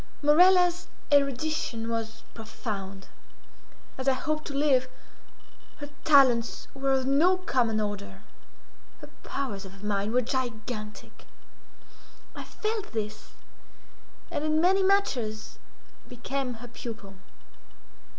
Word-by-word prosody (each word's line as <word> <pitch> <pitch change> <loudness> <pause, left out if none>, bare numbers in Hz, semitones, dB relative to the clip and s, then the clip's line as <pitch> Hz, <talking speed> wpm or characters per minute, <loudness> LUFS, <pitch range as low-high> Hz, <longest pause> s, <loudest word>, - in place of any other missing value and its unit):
Morella's 355 +3 +5 0.2
erudition 280 -4 +1
was 225 -1 -4
profound. 200 -4 -6 0.9
As 260 - -4
I 270 - +5
hope 310 +3 -2
to 285 - -6
live, 275 -3 +3 0.9
her 290 -1 -8 0.2
talents 260 -6 +4
were 275 0 -1
of 265 -1 +2
no 315 +8 +4
common 245 -11 0
order—her 205 -1 -9
powers 250 -8 -4
of 195 +1 -12
mind 205 0 -1
were 250 +1 +2
gigantic. 225 -4 -5 1.1
I - - -6
felt 430 - -4
this, 210 -1 -5 1.0
and, 290 - -2
in 310 0 +2
many 375 +4 +4
matters, 255 - 0 0.5
became 250 +1 -3
her 235 +2 -10
pupil. 220 -4 -8
250 Hz, 100 wpm, -28 LUFS, 215-295 Hz, 1.1 s, Morella's